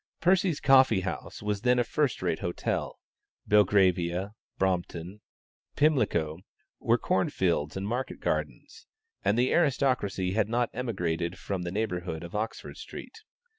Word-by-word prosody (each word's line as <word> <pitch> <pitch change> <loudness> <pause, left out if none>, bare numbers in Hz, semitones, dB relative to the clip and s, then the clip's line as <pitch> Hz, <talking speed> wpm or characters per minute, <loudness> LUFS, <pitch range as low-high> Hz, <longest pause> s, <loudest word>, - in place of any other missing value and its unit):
Percy's 180 -2 +2
Coffee 130 -7 +5
House 95 +2 -5
was 105 -1 -1
then 125 +1 +3
a 120 - +3
first 140 -4 -1
rate 85 -3 0
hotel: 85 - -2 0.5
Belgravia, 95 -2 +3 0.2
Brompton, 90 +1 -2 0.5
Pimlico, 105 - +2 0.4
were - - +3
corn - - +1
fields 85 -3 0
and 95 +1 -3
market 125 +4 -3
gardens, - - -4 0.4
and 105 - +2
the 125 +1 +2
aristocracy 130 - +1
had 110 0 +1
not 120 0 0
emigrated 90 -7 -2
from 95 -2 -4
the 85 -1 -4
neighborhood 90 -5 -3
of 85 - -9
Oxford 110 +2 -4
Street. - - -10
100 Hz, 130 wpm, -28 LUFS, 90-125 Hz, 0.5 s, Coffee